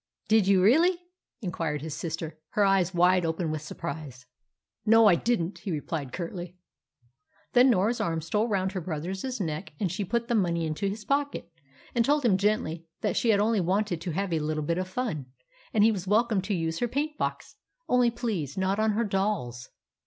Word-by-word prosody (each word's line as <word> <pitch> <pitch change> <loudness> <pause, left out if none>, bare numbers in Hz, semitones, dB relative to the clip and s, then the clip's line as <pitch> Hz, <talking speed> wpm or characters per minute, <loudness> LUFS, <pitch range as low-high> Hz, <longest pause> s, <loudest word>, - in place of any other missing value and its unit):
"Did 215 -3 +4
you 190 -2 +4
really?" 330 - +5 0.5
inquired 160 -5 -2
his 155 -2 -4
sister, 160 -1 -5
her 205 - +3
eyes 195 -2 +3
wide 180 0 +4
open 165 0 -1
with 155 -1 -3
surprise. 155 -5 -7 0.6
"No, 225 +1 +6
I 205 - +7
didn't," 190 -1 0
he - - -6
replied 150 -3 -3
curtly. 175 0 -6 1.0
Then 250 +2 +6
Norah's 225 +1 +2
arm 165 -1 0
stole 210 +8 0
round 190 -3 0
her 190 -2 -4
brother's 185 - -4
neck, 160 -3 -4
and 185 -5 0
she 195 +3 -2
put 235 +4 -1
the 240 - 0
money 170 -6 +1
into 155 +6 -2
his 210 +2 -5
pocket, 280 -8 -1 0.4
and 235 - +3
told 290 +2 +2
him 195 -5 +4
gently 170 -6 0
that - - 0
she 235 - +1
had 205 -2 +5
only 215 0 +2
wanted 185 -1 0
to 180 - -4
have 185 +2 -2
a 160 - +1
little 155 0 -2
bit 170 +4 0
of 185 - -2
fun, 185 - -3 0.4
and 210 - +3
he 225 - +6
was 195 -3 -4
welcome 215 0 +2
to 195 +2 -2
use 165 -1 -2
her 240 - +1
paint 295 +5 -2
box - - -3 0.3
only 250 -1 +4
please 215 - -3
not 190 +2 0
on 220 0 +2
her 225 +3 +1
dolls. 190 - -2
190 Hz, 195 wpm, -27 LUFS, 165-220 Hz, 1.0 s, I